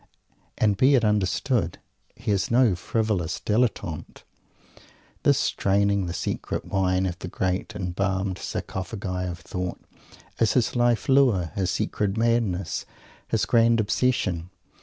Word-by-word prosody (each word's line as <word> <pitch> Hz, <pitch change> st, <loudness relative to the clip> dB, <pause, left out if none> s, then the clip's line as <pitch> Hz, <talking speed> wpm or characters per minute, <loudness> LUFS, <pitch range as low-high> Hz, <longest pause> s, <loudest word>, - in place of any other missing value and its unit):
And, 105 Hz, -3 st, +2 dB
be 135 Hz, +5 st, +5 dB
it 120 Hz, -4 st, +3 dB
understood, 105 Hz, -1 st, +1 dB, 0.4 s
he -, -, -3 dB
is 100 Hz, -2 st, +1 dB
no 120 Hz, -3 st, +4 dB
frivolous 95 Hz, -3 st, -1 dB
Dilettante. 105 Hz, -7 st, -1 dB, 1.0 s
This -, -, +3 dB
draining 100 Hz, -1 st, +1 dB
the 85 Hz, -, -3 dB
secret -, -, -3 dB
wine 95 Hz, -1 st, +1 dB
of 90 Hz, -2 st, -3 dB
the -, -, -6 dB
great 90 Hz, +1 st, -2 dB
embalmed 95 Hz, 0 st, -2 dB
Sarcophagi 95 Hz, -1 st, -4 dB
of 85 Hz, -, -5 dB
Thought 90 Hz, +1 st, -4 dB, 0.6 s
is 115 Hz, -, +3 dB
his 125 Hz, -1 st, +1 dB
Life 120 Hz, -1 st, +2 dB
Lure, 125 Hz, -, +3 dB
his 95 Hz, -2 st, -1 dB
secret 100 Hz, +3 st, -1 dB
madness, 115 Hz, -5 st, 0 dB, 0.4 s
his -, -, +1 dB
grand 115 Hz, 0 st, +4 dB
obsession. 100 Hz, -6 st, 0 dB
100 Hz, 125 wpm, -25 LUFS, 90-115 Hz, 1.0 s, be